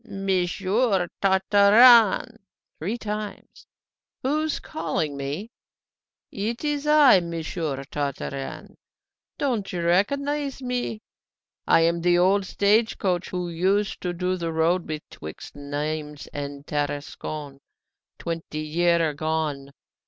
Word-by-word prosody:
"Monsieur 195 0 0
Tartarin!" 205 +4 +6 0.4
three 200 +9 -2
times. 210 -2 -6 0.6
"Who's 305 +3 0
calling 155 -2 -3
me?" 145 - -5 0.8
"It's 280 +8 -2
I, 300 -8 +7
Monsieur 165 -4 -4
Tartarin. 140 -1 -5 0.6
Don't 235 -8 -1
you 175 -2 -3
recognise 280 +11 0
me? 250 -4 -3 0.6
I - - +5
am 170 +1 +2
the 175 0 +3
old 190 +2 +3
stage 215 +3 +2
coach 180 -3 -1
who 180 -1 -3
used 190 +5 0
to 180 - -2
do 180 +1 -1
the 170 -2 -3
road 165 +2 +1
betwixt 150 - -8
Nimes 150 +1 -4
and 140 0 -6
Tarascon 145 -1 -4 0.6
twenty 165 -2 -5
year 170 +2 +2
agone. 150 -2 -2
175 Hz, 100 wpm, -24 LUFS, 155-210 Hz, 0.8 s, I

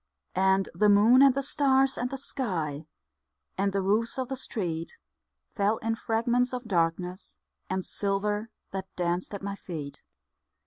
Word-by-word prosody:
And 190 +1 +3
the 210 0 +3
moon 220 +6 +6
and 275 -2 +6
the 275 - 0
stars 270 -1 +3
and 245 - -2
the 270 - -4
sky, 170 - -3 0.7
And 200 +1 +1
the 195 0 -1
roofs 220 +6 +1
of 260 -2 -2
the 265 - -2
street, 175 - -3 0.6
Fell 205 +2 +1
in 225 +1 -1
fragments 235 +2 0
of 250 -1 -3
darkness 180 -1 -1 0.3
and 190 0 -2
silver 205 +2 -1 0.2
That 190 -1 -4
danced 175 +3 -1
at 200 - -8
my 200 0 -3
feet. 150 -7 -7
205 Hz, 150 wpm, -28 LUFS, 185-245 Hz, 0.7 s, moon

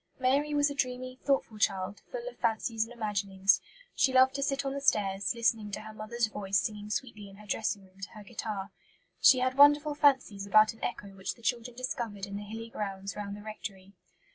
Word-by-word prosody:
Mary 275 +3 +2
was 290 0 +3
a - - -3
dreamy, 255 -1 -3
thoughtful 270 -6 0
child, 195 -1 0
full - - -5
of - - -6
fancies 225 0 0
and 230 - -14
imaginings. 200 -4 +1 0.3
She 265 - +3
loved 260 0 +5
to 280 - -3
sit 275 0 0
on 270 - -1
the 280 - -4
stairs, 195 -6 +1
listening 225 -2 +1
to - - -3
her 220 0 -9
mother's 225 +2 -1
voice 200 -2 0
singing 210 -1 -4
sweetly 215 -3 -4
in 195 - -14
her 210 +1 -14
dressing 205 -1 -1
room 190 +1 -23
to 195 - -5
her 215 -2 -10
guitar. 205 -2 -5 0.5
She 255 -2 +7
had 255 +1 0
wonderful 290 +1 +7
fancies 265 -9 +2
about 215 +2 +6
an 225 - -16
echo 200 - -3
which 195 0 -5
the 235 - -21
children 240 0 -2
discovered 235 -6 -3
in 200 0 -7
the 205 - -4
hilly 225 +2 -7
grounds 195 -2 -4
round 205 -1 -5
the 205 - -11
rectory. 195 -2 -8
220 Hz, 210 wpm, -30 LUFS, 200-255 Hz, 0.5 s, She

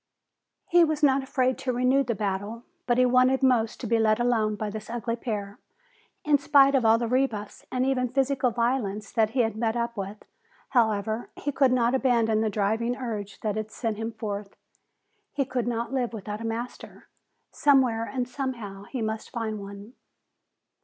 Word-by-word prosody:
He 350 0 +5
was 310 -2 0
not 275 -1 +5
afraid 260 -1 0
to 255 - -1
renew 255 +3 +2
the 235 -3 -2
battle, 205 +3 -3 0.2
but 240 -1 +2
he 255 - +5
wanted 255 +2 +3
most 240 -4 +2
to - - -4
be 230 0 +2
let 215 0 +3
alone 225 -3 +1
by 210 0 -4
this 215 +1 -7
ugly 235 0 -2
pair. 210 -4 -5 0.7
In 295 -1 +4
spite 280 -1 +5
of 265 -3 +3
all 225 0 +5
the 235 0 -2
rebuffs 235 -5 -1
and 255 0 0
even 255 -2 +1
physical 270 0 +1
violence 230 -3 -1
that 220 -2 +2
he 250 +2 +1
had 225 -2 0
met 225 0 0
up 235 0 -2
with, 200 +1 -6 0.4
however, 220 -1 +1
he 290 - -3
could 270 -2 +3
not 245 -1 +2
abandon 235 -4 +2
the 220 - +1
driving 220 +4 0
urge 210 -6 -5
that 210 -2 -1
had 215 0 -3
sent 220 -1 -3
him 225 +1 -3
forth. 210 -2 -5 0.8
He 280 -1 0
could 250 -2 -2
not 235 +1 -2
live 250 -3 -1
without 210 0 -6
a 230 - -3
master. 235 +2 -6 0.4
Somewhere 255 -6 +3
and 250 -2 -2
somehow 235 -8 -5
he 250 0 -4
must 220 0 -3
find 220 -3 -3
one. 200 +3 -10
235 Hz, 180 wpm, -26 LUFS, 215-255 Hz, 0.8 s, He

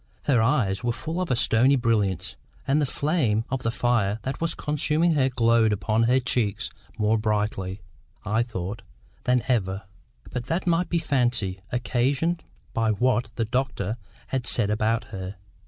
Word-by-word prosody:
Her 130 -6 +3
eyes 115 -5 +1
were 120 -1 +1
full 160 +8 -3
of 180 - -2
a 125 - +3
stony 120 +4 +4
brilliance, 100 -7 0 0.3
and 140 +3 +3
the 145 - +1
flame 130 -8 +1
of 135 -1 -1
the 115 - 0
fire 115 -4 +1
that 135 +4 -4
was 165 - 0
consuming 150 +3 +1
her 135 -3 +3
glowed 115 -3 +3
upon 110 +2 +1
her 130 +1 +5
cheeks 120 -5 -1 0.3
more 110 +1 +2
brightly, 105 -3 -1 0.4
I 110 +3 +2
thought, 105 -3 -4 0.4
than 125 -1 +3
ever; 95 -6 0 0.5
but 125 -1 -3
that 165 +7 -1
might 175 0 +2
be 170 - +1
fancy, 120 - 0
occasioned 135 +7 0 0.3
by 115 -1 +1
what 120 +2 +1
the 115 - 0
doctor 115 -3 -1 0.3
had 130 -3 -2
said 105 -4 +1
about 110 +2 +1
her. 95 0 -5
120 Hz, 160 wpm, -25 LUFS, 105-135 Hz, 0.5 s, her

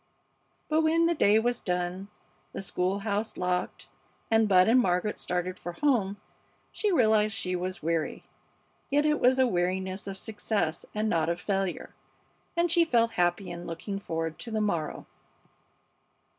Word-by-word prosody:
But 310 +1 +2
when 325 +1 +3
the 340 - +3
day 210 -9 +4
was 240 +2 +1
done, 180 +1 -2 0.5
the - - -4
school 190 +1 -1
house 210 +1 -2
locked, 180 -6 -2 0.4
and 225 -1 +4
Bud 185 -1 +6
and 240 +3 +5
Margaret 185 -1 0
started 180 +1 -2
for 175 - -6
home, 205 -5 +1 0.5
she 420 -3 0
realized 220 - +3
that - - -2
she 180 -3 -1
was 185 -1 -4
weary. 165 -1 -1 0.7
Yet 290 +2 +2
it 300 0 +2
was 255 +1 +4
a 260 - +5
weariness 185 -1 -1
of 195 -1 -4
success 205 -5 -2
and 215 +1 0
not 165 -5 +1
of 170 +1 -1
failure, 195 -1 -2 0.6
and 340 -1 +2
she 340 0 +5
felt 230 -7 +2
happy 175 -2 0
in 175 0 -7
looking 195 +4 -5
forward 165 -4 -4
to 235 - -5
the 220 -1 -1
morrow. 170 -8 -2
200 Hz, 160 wpm, -28 LUFS, 180-230 Hz, 0.7 s, Bud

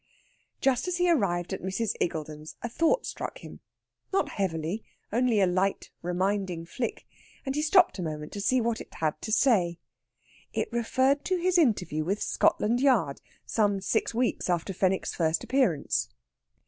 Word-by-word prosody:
Just 265 +3 +2
as 360 -1 -1
he 355 0 +2
arrived 190 - +1
at - - -4
Mrs. 190 +4 -1
Iggulden's 155 -2 -3
a 235 - -2
thought 330 - +2
struck - - -5
him - - -10 0.5
not 390 - +1
heavily; 180 +1 -2 0.3
only 240 -2 +3
a 195 - +5
light, 185 +2 0
reminding 180 -1 -1
flick 235 +7 -4 0.4
and 270 - -1
he 300 - 0
stopped 360 - +4
a - - -1
minute 150 -2 -5
to 205 - -5
see 255 +5 +3
what 230 -1 -1
it - - -12
had 155 -1 -1
to 215 - -4
say. 195 -9 +3 0.8
It - - -1
referred 260 +4 +2
to 370 - +1
his 360 +1 +1
interview 190 - +1
with 195 +6 -1
Scotland 235 +3 +2
Yard, 220 - +2 0.2
some 205 -3 +1
six 195 +4 0
weeks 240 -4 -1
after 175 +2 0
Fenwick's 185 +1 0
first 160 -1 0
appearance. 245 - +1
205 Hz, 160 wpm, -28 LUFS, 175-255 Hz, 0.8 s, a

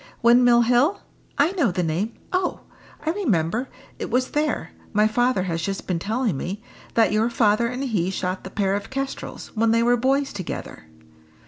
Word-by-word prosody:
"Windmill 240 0 +6
Hill? 250 - +3 0.4
I 295 +5 +4
know 340 - +2
the 180 0 -1
name. 175 +8 -1 0.2
Oh! 365 -1 0 0.4
I 315 - +2
remember: 240 - 0 0.3
it - - -4
was 255 +2 0
there 300 0 -1 0.2
my 210 0 +4
father 245 -3 +1
has 165 -3 -2
just 195 +3 -3
been 180 -3 -1
telling 220 - -1
me 195 - -5 0.3
that 225 -1 +4
your 220 +2 +2
father 230 -1 +2
and 250 +3 -3
he 205 -9 0
shot 185 0 -3
the 190 - -7
pair 195 -1 0
of 200 0 -3
kestrels, 270 0 -5
when 225 +1 +2
they 230 +1 +3
were 245 +1 +4
boys 270 +3 +1
together." - - -6
230 Hz, 180 wpm, -23 LUFS, 195-260 Hz, 0.4 s, Windmill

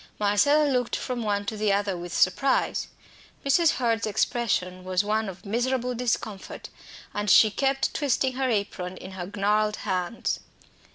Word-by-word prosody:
Marcella 210 +9 +3
looked 250 -3 0
from 250 -2 -3
one 205 -2 -1
to 220 - -3
the 210 -1 +1
other 200 -1 0
with 175 0 -7
surprise. 260 +9 +1 0.6
Mrs. 310 +4 +4
Hurd's 230 -3 0
expression 190 -4 -1
was 185 +1 0
one 215 0 0
of 190 +1 -11
miserable 250 +3 0
discomfort, 225 -4 -3 0.4
and 205 0 -2
she 215 +2 +7
kept 270 +4 0
twisting 265 -2 +1
her 260 0 -1
apron 195 -4 -2
in 190 - -9
her 185 -1 -6
gnarled 210 +1 +2
hands. 185 +2 -1
215 Hz, 150 wpm, -26 LUFS, 195-250 Hz, 0.6 s, she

